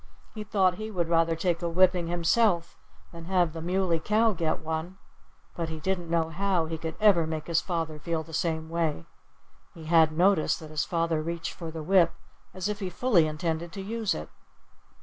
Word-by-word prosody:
He 215 - -6
thought 190 -3 +1
he 215 0 -4
would 175 -5 -2
rather 165 -1 +3
take 170 +1 -1
a 170 - -1
whipping 180 0 +3
himself 175 +1 +1 0.4
than 170 -1 -10
have 175 -3 +1
the 165 - -6
Muley 180 -1 0
Cow 215 +5 +2
get 160 -3 -1
one. 160 +4 -4 0.6
But 165 -2 -3
he 160 -1 -5
didn't 180 -1 -2
know 165 -1 +1
how 185 -1 0
he 160 0 -5
could 160 0 -5
ever 195 -7 +4
make 160 -1 -4
his 170 -2 +1
father 165 -4 -3
feel 165 0 -2
the 160 - -13
same 160 -1 -1
way. 160 - -1 0.7
He 165 - -10
had 160 -1 +5
noticed 175 +1 +2
that 155 -1 -10
his 155 -1 -1
father 165 -2 0
reached 170 +1 -4
for 165 -2 -7
the 160 -1 -6
whip 175 0 +4 0.4
as 185 +1 -3
if 210 0 -3
he 190 -3 -3
fully 180 -4 +3
intended 165 +2 -3
to 195 - -5
use 220 +1 -1
it. 75 - -7
170 Hz, 195 wpm, -27 LUFS, 160-185 Hz, 0.7 s, had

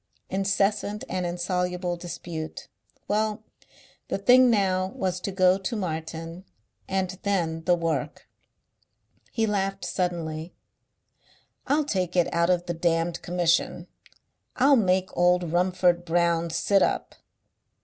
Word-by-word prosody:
Incessant 200 +2 0
and 180 -1 -2
insoluble 180 0 -2
dispute. 170 -2 -7 0.4
Well, 215 0 0 0.6
the - - -1
thing 250 +5 +6
now 190 -4 +2
was 185 -1 -1
to 195 - -4
go 185 0 +3
to 195 +4 -3
Martin.... 165 -2 -5 0.4
And 190 -1 -2
then 165 -5 -1
the 180 - +4
work! 160 -4 -3 1.0
He 225 -2 +1
laughed 195 -2 -1
suddenly. 170 -2 -3 1.1
"I'll 295 +2 +2
take 185 - -2
it 175 -2 +2
out 170 +1 +2
of 175 -1 +2
the 175 - -2
damned 165 0 0
Commission. 175 -1 0 0.7
I'll 275 +2 +5
make 185 -5 +1
old 175 -1 +2
Rumford 180 -1 +2
Brown 170 0 +1
sit 195 +4 +2
up." - - 0
180 Hz, 120 wpm, -26 LUFS, 170-195 Hz, 1.1 s, thing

